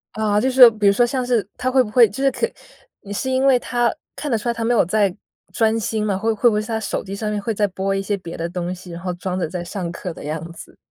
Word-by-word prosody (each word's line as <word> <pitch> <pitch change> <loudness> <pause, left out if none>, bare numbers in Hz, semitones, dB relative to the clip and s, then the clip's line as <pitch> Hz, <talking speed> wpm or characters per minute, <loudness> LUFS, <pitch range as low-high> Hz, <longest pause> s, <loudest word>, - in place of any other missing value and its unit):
啊， 210 -1 +1
就 260 - +2
是 260 - -4
说 245 - +12
比 215 -2 -3
如 200 - +7
说 240 +4 +3
像 255 +1 -2
是 235 -6 +1
他 255 +1 -1
会 260 0 +5
不 225 - -2
会， 235 +1 +6
就 240 +7 -6
是 275 - +5
肯 470 - -2 0.5
你 200 - -8
是 260 +6 -2
因 260 +1 +2
为 270 -2 +6
他 240 -1 0 0.2
看 295 - -4
得 230 - +2
出 235 +3 -3
来 - - +1
他 230 - -4
没 235 +2 +2
有 230 - +4
在， 200 0 +1 0.4
专 225 0 +2
心 215 -1 -2
嘛， 200 -2 0
会 225 +3 0
会 235 +3 +4
不 - - -1
会 210 - +1
是 215 - -8
他 225 -1 -1
手 220 - -3
机 195 0 -6
上 215 +1 -3
面 210 - -2
会 225 +2 -2
在 205 0 +1
播 195 +1 -2
一 195 - -1
些 200 +1 -1
别 170 -3 -8
的 165 - -2
东 180 0 -3
西， 180 0 -12
然 170 0 -7
后 180 0 -3
装 180 +1 -4
着 180 - -1
在 180 -2 -4
上 175 0 -5
课 175 0 -6
的 - - -11
样 160 +3 -5
子？ - - -13
210 Hz, 335 characters per minute, -21 LUFS, 190-240 Hz, 0.5 s, 说